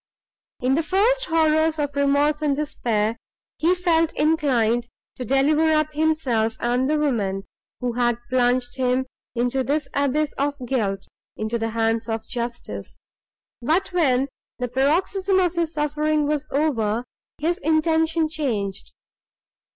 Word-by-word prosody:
In 255 +1 +2
the 310 - +2
first 445 +9 +2
horrors 315 -1 +2
of 290 -2 -2
remorse 285 +2 +2
and 290 -2 +1
despair, 230 -7 -1 0.4
he 345 +3 +3
felt 335 -3 +2
inclined 245 -7 +2 0.3
to 255 - -4
deliver 290 +5 +3
up 305 0 +1
himself 285 -8 +1
and 250 +3 +1
the 305 - +2
woman, 210 -10 0 0.4
who 245 -1 -1
had 240 -1 +1
plunged 245 0 +1
him 255 0 +1 0.3
into 245 +2 0
this 290 +3 -1
abyss 285 +2 +1
of 285 +1 0
guilt, 200 -6 -1 0.3
into 220 +2 -2
the 225 0 -1
hands 225 0 0
of 225 0 -3
justice; 240 -1 -5 0.6
but, 355 +9 0
when 275 -6 +2 0.3
the 250 - -2
paroxysm 365 - +1
of 355 -2 +2
his 335 -2 -1
suffering 300 0 +1
was 300 0 -1
over, 240 -7 0 0.3
his 340 +5 -1
intention 320 0 +2
changed. 220 -11 -3
280 Hz, 135 wpm, -23 LUFS, 240-315 Hz, 0.6 s, he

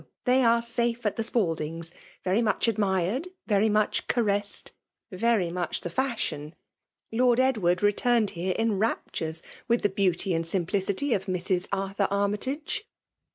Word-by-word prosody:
they 255 +1 +4
are 235 0 +4
safe 235 0 -1
at 210 - +1
the 225 - -1
Spaldings' 165 -6 -1 0.2
— - - -27
very 190 +5 +2
much 220 -2 +1
admired^ 205 - 0 0.2
very 210 0 +3
much 215 0 +1
ca 245 - +2
ressed^ 205 -1 -1 0.4
very 195 -2 +1
much 175 -1 -2
the 175 - -5
fashion. 175 - -2 0.6
Lord 245 +1 +3
Edward 210 -9 +2
returned 215 +1 +3
here 180 +2 -2
in 225 -3 +1
raptures 165 -6 -2 0.2
with 235 0 +2
the 205 - +3
beauty 190 -1 +2
and 165 0 0
simplicity 195 - 0
of 195 -1 -2
Mrs. 185 0 0
Arthur 195 0 0
Armytage.' 235 - -2
205 Hz, 150 wpm, -27 LUFS, 180-235 Hz, 0.6 s, they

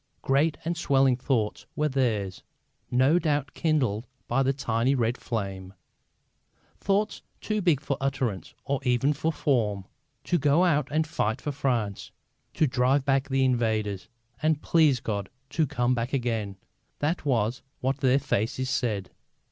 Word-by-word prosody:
Great 145 +4 +2
and 170 +1 0
swelling 135 -5 +3
thoughts 120 -4 -1
were 150 - +1
theirs, 110 -9 -1 0.5
no 130 +7 +4
doubt, 145 -5 -1
kindled 130 - 0 0.2
by 120 +3 +2
that 135 0 +1
tiny 120 0 +1
red 120 -1 +1
flame: 95 -6 -5 1.0
thoughts 200 +2 0 0.2
too 215 -1 -1
big 170 -7 +3
for 140 -1 -2
utterance 130 -9 -2
or 135 +1 0
even 130 +2 +2
for 160 +3 -1
form. 110 -11 0 0.4
To 175 - +1
go 145 +5 +4
out 150 -5 +2
and 155 +2 +1
fight 130 -7 -1
for 145 - -3
France, 120 -8 -1 0.5
to 155 - +3
drive 130 +1 +2
back 135 0 +1
the 135 0 +2
invaders, 110 -6 0 0.3
and, 155 -1 +2
please 155 -6 +4
God, 100 -3 -3 0.2
to 155 +1 +1
come 125 0 +1
back 120 +1 -2
again 115 -6 -1 0.4
that 155 +4 -1
was 120 -3 0 0.2
what 130 +1 0
their 130 -1 +4
faces 130 -1 -1
said. 105 -8 -1
130 Hz, 150 wpm, -27 LUFS, 115-145 Hz, 1.0 s, no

